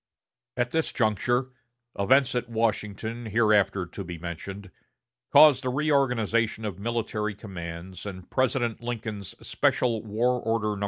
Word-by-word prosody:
At 120 0 0
this 160 0 0
juncture, 120 +3 +1 0.4
events 130 +6 +3
at 125 -1 -2
Washington, 110 0 -2
hereafter 105 -4 +3
to 95 +3 -7
be 90 -1 -7
mentioned, 90 +3 -7 0.6
caused 145 -4 +7
a 130 - 0
reorganization 125 -6 +1
of 100 -3 -4
military 110 -1 -2
commands 90 -3 -8
and 95 -2 -8
President 125 -3 0
Lincoln's 110 -4 -5
Special 115 -3 +1
War 120 +3 0
Order 110 -2 0
No. - - -7
110 Hz, 125 wpm, -27 LUFS, 100-120 Hz, 0.6 s, caused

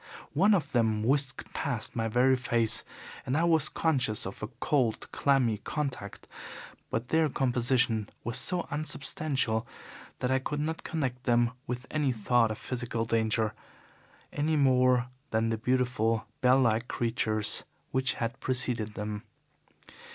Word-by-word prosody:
One 200 +7 +5
of 175 - -2
them 110 -3 +1
whisked 135 +2 0
past 135 -8 -2
my 115 -1 0
very 125 +4 +4
face, 120 -3 +1 0.4
and 130 +3 -1
I 165 - +2
was 160 -3 +3
conscious 130 -9 0
of 95 - -7
a 105 - -3
cold, 130 -8 0
clammy 130 -7 +2
contact, 130 -7 -5 0.6
but 115 +2 -3
their 160 -1 +3
composition 125 -4 +1
was 120 +3 0
so 180 +3 +1
unsubstantial 140 -5 -1 0.5
that 125 - -1
I 130 - +3
could 145 +2 -3
not 160 +2 -3
connect 130 -6 -3
them 120 -1 +3 0.2
with 125 0 -4
any 150 -3 +1
thought 115 0 +2
of 110 - -4
physical 120 0 -3
danger, 110 -1 +1 0.8
any 155 +2 0
more 130 -2 +4 0.2
than 110 +1 +1
the 115 - 0
beautiful 125 -2 +1 0.2
bell 130 +1 +5
like 115 -1 +2
creatures 115 -3 +2 0.3
which 130 0 +1
had 120 +3 -3
preceded 125 -5 0
them. 105 0 -4
125 Hz, 140 wpm, -29 LUFS, 115-135 Hz, 0.8 s, One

